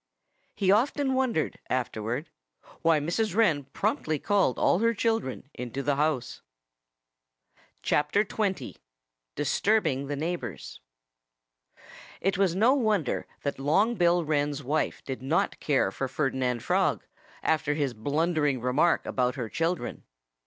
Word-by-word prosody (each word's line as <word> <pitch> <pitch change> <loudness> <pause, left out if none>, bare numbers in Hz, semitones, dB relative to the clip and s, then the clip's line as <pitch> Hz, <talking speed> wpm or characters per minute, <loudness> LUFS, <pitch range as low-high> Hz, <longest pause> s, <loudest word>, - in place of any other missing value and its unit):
He 190 -2 +2
often 265 +5 +2
wondered, 255 -11 0
afterward, 120 +3 -2 0.5
why 165 -2 +4
Mrs. 175 +6 -1
Wren 165 -11 +3
promptly 150 +3 -1
called 195 -5 +1
all 175 - +3
her 230 +1 +2
children 225 - -1
into 125 +2 -5
the 145 0 +1
house. 145 -4 -1 1.4
XX 195 +6 0 0.6
DISTURBING 160 -11 +1
THE 145 - -2
NEIGHBORS 170 +4 -5 1.4
It 195 +1 0
was 190 -2 +2
no 225 +7 +5
wonder 215 - 0 0.2
that 140 -2 -2
Long 195 +12 +3
Bill 175 -4 +2
Wren's 145 -1 0
wife 150 +5 -1
did 130 -2 -5
not 145 +6 0
care 145 -3 +1
for 135 - -3
Ferdinand 130 -3 -1
Frog, - - +1 0.4
after 150 -2 +1
his 140 -4 -1
blundering 145 +3 0
remark 130 +8 +2
about 125 -1 0
her 120 -4 -4
children. 165 +6 -2
155 Hz, 120 wpm, -28 LUFS, 135-195 Hz, 1.4 s, no